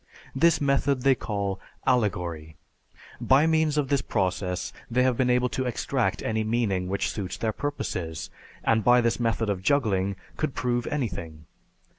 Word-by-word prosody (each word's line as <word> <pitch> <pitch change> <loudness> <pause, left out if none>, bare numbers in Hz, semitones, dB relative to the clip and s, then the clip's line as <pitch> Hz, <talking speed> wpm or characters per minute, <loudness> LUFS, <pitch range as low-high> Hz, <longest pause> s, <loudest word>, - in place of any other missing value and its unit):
This 160 +3 +4
method 140 -2 +1
they 135 0 +6
call 100 -5 -3 0.3
"Allegory." 90 -10 0 0.7
By 135 +4 +5
means 160 -2 +2
of 140 -3 +1
this 140 -2 +2
process 90 -2 -2 0.2
they 125 +2 +2
have 130 -1 +2
been 125 0 +1
able 125 0 +3
to 130 - -2
extract 120 - -1
any 110 0 0
meaning 110 -5 0
which 100 +1 -1
suits 95 -4 -4
their 110 -1 -1
purposes, 90 - -4 0.3
and 110 -1 +2
by 125 +2 +6
this 115 0 0
method 115 -1 0
of 100 -3 -1
juggling 100 -5 +1 0.2
could 155 -3 -2
prove 120 -1 -1
anything. 85 - -4
115 Hz, 155 wpm, -26 LUFS, 95-130 Hz, 0.7 s, they